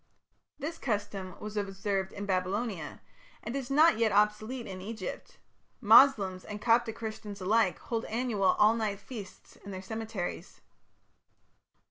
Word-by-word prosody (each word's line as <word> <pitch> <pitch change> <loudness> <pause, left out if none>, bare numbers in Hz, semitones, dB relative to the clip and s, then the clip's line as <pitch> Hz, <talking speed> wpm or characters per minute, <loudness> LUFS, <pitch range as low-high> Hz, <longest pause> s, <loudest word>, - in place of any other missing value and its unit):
This 315 +3 -5
custom 200 -5 -3
was 210 0 -7
observed 195 -1 -2
in 205 - -6
Babylonia, 190 -2 -2 0.4
and 230 +4 -4
is 270 -3 -3
not 300 -2 +5
yet 225 -2 +3
obsolete 210 +4 +1
in 185 -1 -7
Egypt; 225 - -7 0.4
Moslems 210 -5 +6
and 210 0 -7
Coptic 230 0 +2
Christians 215 -2 -6
alike 200 0 +2
hold 230 -1 -3
annual 220 -5 +1
all 215 +1 +6
night 215 -3 -2
feasts 205 -3 -10
in 200 - -12
their 190 -1 -6
cemeteries. 220 -3 -5
210 Hz, 130 wpm, -30 LUFS, 195-230 Hz, 0.4 s, Moslems